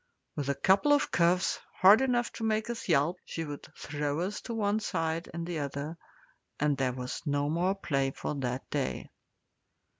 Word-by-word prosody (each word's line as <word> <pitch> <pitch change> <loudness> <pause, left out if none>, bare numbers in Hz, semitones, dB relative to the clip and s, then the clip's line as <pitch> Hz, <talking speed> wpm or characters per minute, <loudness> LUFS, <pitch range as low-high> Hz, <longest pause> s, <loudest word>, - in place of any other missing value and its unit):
With 145 -2 -2
a 140 - +1
couple 195 - +4
of 290 - +2
cuffs, 175 +2 +2 0.2
hard 200 +6 +7
enough 245 -2 +1
to 225 - -6
make 220 +1 0
us 230 -4 -6
yelp, 160 +3 +3
she 165 - -4
would 145 -1 -7
throw 145 +1 -2
us 190 +4 -3
to 235 - -5
one 210 -1 +1
side 165 -5 -2
and 170 0 -4
the 170 -2 -3
other, 145 +2 -4 0.6
and 150 -1 +2
there 130 -1 0
was 125 0 -5
no 145 0 +1
more 180 +4 +1
play 135 -8 0
for 135 - -4
that 130 -2 -3
day. 140 -3 -2
165 Hz, 180 wpm, -30 LUFS, 145-200 Hz, 0.6 s, hard